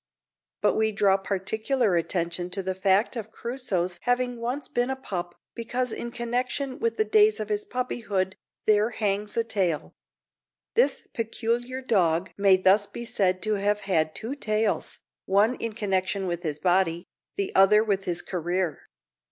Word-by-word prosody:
But - - +4
we 220 0 +1
draw 200 -2 +3
particular 210 +3 0
attention 170 +1 -1
to 195 - -1
the 190 0 -1
fact 195 +5 +2
of 220 -2 -6
Crusoe's 205 -9 -2
having 245 -1 0
once 255 +4 -3
been 245 +1 0
a 265 - -1
pup, 175 -9 -5 0.2
because 245 +1 -2
in 235 - -4
connection 250 +3 -2
with 460 0 0
the 435 - +2
days 430 0 +4
of - - -4
his 420 0 0
puppyhood 210 - -2 0.3
there 215 +1 +4
hangs 210 -2 -2
a 230 - +3
tale. 185 -8 -1 0.8
This 480 - +2
peculiar 240 +3 -2
dog 180 -7 +2
may 195 -2 +5
thus 195 +2 +4
be 235 - -7
said 185 -5 0
to 215 0 +1
have 205 +1 0
had 160 -5 0
two 230 +4 -4
tails 215 -5 -1 0.3
one 205 +5 +4
in 230 -1 -4
connection 195 -2 -1
with 175 -1 -2
his 155 -4 -3
body, 175 0 +1 0.3
the 200 - -2
other 205 +3 +6
with 195 -3 -1
his 175 -1 -1
career. 175 -1 -2
210 Hz, 160 wpm, -26 LUFS, 185-240 Hz, 0.8 s, other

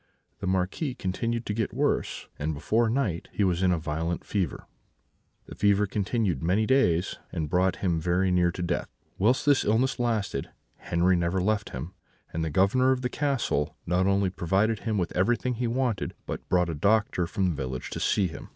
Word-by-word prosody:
The 100 - -4
Marquis 95 - -1
continued 115 +4 -2
to 105 - -2
get 110 0 -2
worse, - - -1
and 75 +1 -1
before 110 +10 +1
night 110 -9 -1
he 105 - 0
was 90 -2 +1
in 95 -1 +3
a 90 - +2
violent 80 +2 -3
fever. 95 -8 -2 0.8
This - - -12
fever 100 0 +4
continued 100 - -1
many 95 +6 +2
days, 90 -10 +2
and 75 -2 -3
brought 95 +1 +2
him 85 -3 +1
very 90 +3 +1
near 90 -1 +3
to 90 - -4
death. 85 0 -2 0.3
Whilst 120 +8 +3
this 145 -2 +4
illness 120 +5 +1
lasted 110 - -1 0.4
Henri 90 +2 +3
never 85 +2 0
left 105 +2 0
him, 75 +9 -6 0.4
and 80 - -1
the 80 - -1
Governor 100 - +3
of 130 -1 0
the 125 - 0
castle 135 - -1
not 90 +2 +2
only 100 -1 +2
provided 95 +5 +1
him 110 -3 -2
with 90 -3 -2
everything 120 +6 +1
he 120 +1 -2
wanted, 120 -3 -1
but - - -6
brought 90 -1 +2
a - - -3
doctor 100 +2 +2
from 95 +1 0
the 85 - -2
village 65 -3 -4
to - - -4
see 100 - +2
him. 85 - -7
95 Hz, 190 wpm, -27 LUFS, 85-110 Hz, 0.8 s, fever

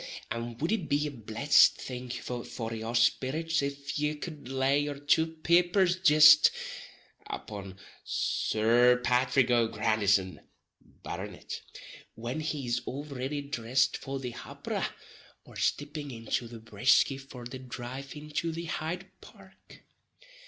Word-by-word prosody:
Och! - - -9 0.3
and 115 0 -5
wouldn't 175 +4 0
it - - -12
be 145 +1 +2
a 150 - -3
blessed 115 +3 +4
thing 125 -1 -7
for 120 -2 -5
your 115 +1 -4
spirrits 140 +7 +2
if 140 +1 -4
ye 150 +1 0
cud 150 -3 -8
lay 135 +2 +2
your 145 -1 -2
two 145 +3 +3
peepers 175 +3 +3
jist, 155 -2 +8 0.8
upon 100 -3 -7 0.3
Sir 120 +3 +2
Pathrick 125 0 +3
O'Grandison, 105 -5 +2 0.4
Barronitt, - - -8 0.5
when 120 +6 -4
he 150 -3 -3
is 120 0 0
all 140 +2 -4
riddy 140 0 -4
drissed 130 -1 +1
for 135 0 -5
the 125 -2 -5
hopperer, 120 - -4 0.6
or - - -15
stipping 145 0 -2
into 115 0 -3
the 115 0 -9
Brisky 115 +5 +2
for 130 -3 -10
the 130 +2 -7
drive 130 +2 -7
into 150 +2 -3
the 165 +1 -5
Hyde 165 +3 -3 0.2
Park. - - -17
135 Hz, 130 wpm, -29 LUFS, 120-150 Hz, 0.8 s, jist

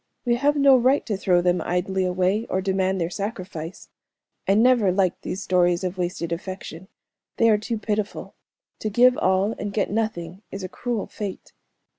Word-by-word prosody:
We 240 - +3
have 290 +3 +2
no 280 -2 +6
right 255 +3 +2
to 215 - -1
throw 180 -2 +2
them 180 0 +2
idly 185 +1 -1
away, 185 +4 0
or 190 - 0
demand 190 0 0
their 170 0 -1
sacrifice. 185 -5 -6 0.6
I 195 - +4
never 230 -3 +4
liked 185 -1 0
these 195 - -4
stories 175 -1 +2
of 185 0 -3
wasted 175 -1 -2
affection. 185 0 -6 0.5
They 230 -1 +5
are 210 - +3
too 225 +2 -3
pitiful. 210 -1 -3 0.5
To 215 - -2
give 245 +4 +5
all 190 +1 +2
and 205 - -3
get 200 -1 -1
nothing 195 -5 -3
is 195 0 -6
a - - -3
cruel 235 +2 -3
fate." 205 -4 -7
195 Hz, 175 wpm, -24 LUFS, 180-220 Hz, 0.6 s, no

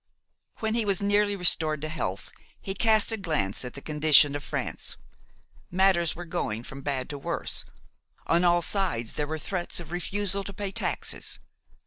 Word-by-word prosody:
When 220 0 0
he 230 0 +1
was 200 -3 0
nearly 205 0 +2
restored 160 -4 +3
to 155 - -2
health, 105 -11 -4 0.3
he 195 - -4
cast 220 +2 +3
a 225 - 0
glance 155 - -1
at 125 - -7
the 140 - -8
condition 150 -1 +5
of 145 - -4
France. - - -2 0.7
Matters 180 -3 +2
were 175 +2 -7
going 115 -8 -3
from 135 +2 -8
bad 135 -2 -2
to 145 - -6
worse; - - +1 0.6
on 170 +2 +3
all 175 -1 +4
sides 170 - +1
there 150 - -2
were 160 +1 -3
threats 175 +3 -3
of 165 -2 -9
refusal 195 +2 -1
to 200 - -6
pay 200 0 -4
taxes. - - -2
175 Hz, 170 wpm, -27 LUFS, 145-195 Hz, 0.7 s, condition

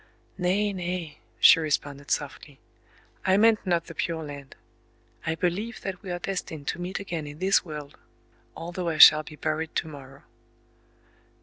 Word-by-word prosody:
"Nay, 195 +3 0
nay!" 175 -4 -4 0.2
she - - +8
responded 145 -2 -2
softly, 145 -1 -4 0.6
"I 190 0 +3
meant 220 -1 +4
not 170 -2 +1
the - - -9
Pure 165 -1 -3
Land. 140 -2 -9 0.7
I 160 - 0
believe 190 +8 -2
that 190 -2 -5
we 195 - -9
are 175 - -2
destined 175 -5 -5
to 175 - -4
meet 180 +2 -4
again 170 -6 -5
in 145 0 -9
this 190 +3 +3
world,—although 165 +3 -8
I 160 - -2
shall 155 0 +10
be 155 0 -11
buried 155 +1 -3
to - - -1
morrow." 135 -3 -12
165 Hz, 150 wpm, -26 LUFS, 150-185 Hz, 0.7 s, shall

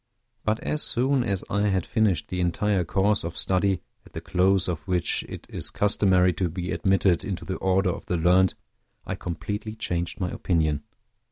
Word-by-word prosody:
But 110 0 0
as 150 - -1
soon 130 +1 +2
as 100 -5 -2
I 100 +1 +1
had 95 -3 0
finished 105 -8 +1
the 90 0 -2
entire 95 +2 +1
course 95 +4 +1
of 85 0 -5
study, 95 0 +1 0.2
at - - -19
the - - -4
close 95 0 +2
of 90 0 -4
which 90 -2 +1
it - - -8
is - - -6
customary 95 -3 +3
to 90 +1 -1
be 90 +2 -4
admitted 95 0 +2
into 95 -4 -4
the 95 - -3
order 95 0 +2
of - - -8
the 90 - 0
learned, 90 +2 +4 0.5
I - - -3
completely 105 +5 -5
changed 85 -5 -3
my 90 -2 -2
opinion. 80 -5 0
95 Hz, 180 wpm, -25 LUFS, 90-100 Hz, 0.5 s, learned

